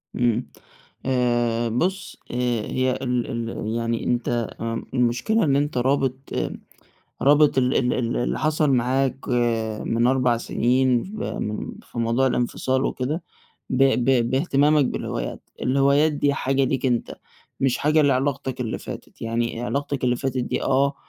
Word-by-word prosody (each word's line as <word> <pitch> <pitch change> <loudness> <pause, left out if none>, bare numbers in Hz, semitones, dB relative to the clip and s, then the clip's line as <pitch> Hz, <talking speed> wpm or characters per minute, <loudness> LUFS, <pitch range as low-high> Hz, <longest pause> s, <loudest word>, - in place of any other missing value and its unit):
إمم. 120 -2 +1 0.6
آآ، 120 -2 +1
بُص 185 - -2
آآ، - - -5 0.4
هي 130 0 +1
ال 125 -2 -1 0.2
ال 110 - -5
يعني 115 0 -1
أنت 120 -2 -1
آمم، 115 0 -3
المشكلة 125 - +1
إن 140 -4 +2
أنت 145 -2 0
رابط 130 +1 +1 1.1
رابط 145 0 +5
ال 125 0 +2
ال 125 -1 +2
ال 120 -2 -1
اللي 120 - -1
حصل 155 -1 +1
معاك 130 +1 0 0.6
من 115 +1 +1
4 125 -2 +3
سنين، 125 +1 +1
ف - - -9
م 105 0 -4
في 120 - -10
موضوع 115 +3 +2
الانفصال 130 +2 0
وكده، 145 +7 -2 0.5
ب 130 +1 +2 0.2
ب 120 -2 +2
باهتمامك 145 +1 +3
بالهوايات. - - -4 0.2
الهوايات 140 +4 +3
دي 145 -1 +1
حاجة 135 0 +1
ليك 130 0 0
أنت، 120 -2 -1 0.5
مش 135 -2 +2
حاجة 155 +1 +3
لعلاقتك 130 -1 0
اللي 115 -3 -2
فاتت، - - -9
يعني 115 +1 -2
علاقتك 140 +1 -2
اللي 125 -1 +2
فاتت 130 0 -2
دي 125 0 -2
آه، 140 +1 +2
130 Hz, 140 wpm, -23 LUFS, 120-140 Hz, 1.1 s, رابط